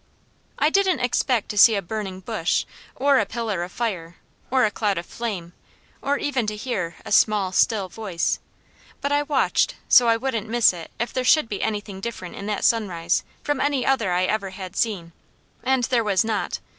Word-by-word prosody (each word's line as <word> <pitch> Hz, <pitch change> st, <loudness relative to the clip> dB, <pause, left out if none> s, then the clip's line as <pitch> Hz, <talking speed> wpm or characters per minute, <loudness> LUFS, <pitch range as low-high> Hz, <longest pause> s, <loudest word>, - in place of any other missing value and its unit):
I 300 Hz, +2 st, +2 dB
didn't 385 Hz, -2 st, +2 dB
expect 245 Hz, -2 st, +1 dB
to 210 Hz, -, -1 dB
see 225 Hz, +1 st, +8 dB
a 200 Hz, -, 0 dB
burning 190 Hz, -1 st, -5 dB
bush, 170 Hz, -2 st, -1 dB, 0.3 s
or 275 Hz, 0 st, +3 dB
a 220 Hz, -, +1 dB
pillar 220 Hz, -5 st, -3 dB
of 175 Hz, +1 st, -5 dB
fire, 180 Hz, -8 st, -3 dB, 0.3 s
or 255 Hz, -2 st, +3 dB
a 210 Hz, -, 0 dB
cloud 205 Hz, -2 st, -1 dB
of 170 Hz, -, -4 dB
flame, 190 Hz, -8 st, -5 dB, 0.5 s
or 285 Hz, +1 st, 0 dB
even 260 Hz, -7 st, -1 dB
to 210 Hz, -, -2 dB
hear 210 Hz, -7 st, -3 dB
a -, -, -8 dB
small, 205 Hz, -2 st, +3 dB
still 200 Hz, 0 st, +2 dB
voice; 185 Hz, -3 st, -2 dB, 0.6 s
but 280 Hz, -, -2 dB
I 290 Hz, 0 st, +3 dB
watched, 290 Hz, -2 st, +1 dB
so 245 Hz, -2 st, +7 dB
I 230 Hz, 0 st, +4 dB
wouldn't 230 Hz, -3 st, -3 dB
miss 235 Hz, -4 st, +4 dB
it 170 Hz, -2 st, -9 dB
if 235 Hz, -, -3 dB
there 255 Hz, -, -1 dB
should 305 Hz, +1 st, +4 dB
be 205 Hz, -3 st, -4 dB
anything 205 Hz, -2 st, -3 dB
different 195 Hz, -5 st, -6 dB
in 200 Hz, -, -7 dB
that 210 Hz, -2 st, -1 dB
sunrise 175 Hz, -7 st, +1 dB, 0.2 s
from 290 Hz, -3 st, -1 dB
any 280 Hz, -3 st, +1 dB
other 245 Hz, -8 st, +1 dB
I 180 Hz, +1 st, +2 dB
ever 200 Hz, 0 st, -1 dB
had 185 Hz, 0 st, -8 dB
seen, 190 Hz, -7 st, -1 dB, 0.5 s
and 260 Hz, -1 st, +1 dB
there 240 Hz, -1 st, +2 dB
was 200 Hz, -2 st, +2 dB
not. 220 Hz, -2 st, -2 dB
215 Hz, 195 wpm, -23 LUFS, 190-250 Hz, 0.6 s, see